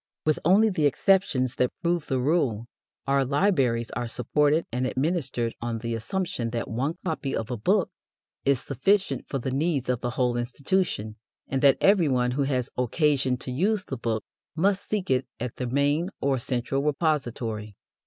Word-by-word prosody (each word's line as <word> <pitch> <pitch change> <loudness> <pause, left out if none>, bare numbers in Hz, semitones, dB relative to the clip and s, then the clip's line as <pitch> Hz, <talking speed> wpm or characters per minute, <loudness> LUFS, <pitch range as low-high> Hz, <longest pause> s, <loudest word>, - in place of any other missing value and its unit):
With 155 -1 +2
only 205 +6 +5
the 155 -6 +2
exceptions 140 -7 +2
that 125 - 0
prove 170 -2 0
the 130 - 0
rule, 125 -6 +1 0.4
our 140 0 +2
libraries 135 - +1
are 120 - -3
supported 145 +7 +1
and 125 +2 0
administered 130 -5 -1
on 120 -1 -2
the 115 +1 -3
assumption 120 - -2
that 115 0 -3
one 135 +9 -2
copy 155 -5 -2
of 115 +2 -3
a - - -1
book 105 - +1 0.5
is 140 -2 +3
sufficient 140 - 0
for 135 - -2
the 130 0 -3
needs 140 -1 0
of 125 -2 0
the 125 - -1
whole 125 -2 +1
institution, 120 - -1 0.3
and 135 0 -1
that 140 -2 +6
every 190 -6 +4
one 125 -1 +1
who 140 +2 0
has 130 -3 -1
occasion 135 0 +2
to 125 - -6
use 190 +9 +1
the 135 - -5
book 115 -3 -2 0.3
must 195 +4 +1
seek 205 -8 -1
it 130 0 +1
at 125 -1 -5
the 125 - -2
main 145 +7 +1
or 135 -2 +1
central 125 +2 -1
repository. 125 - -1
135 Hz, 175 wpm, -26 LUFS, 120-160 Hz, 0.5 s, that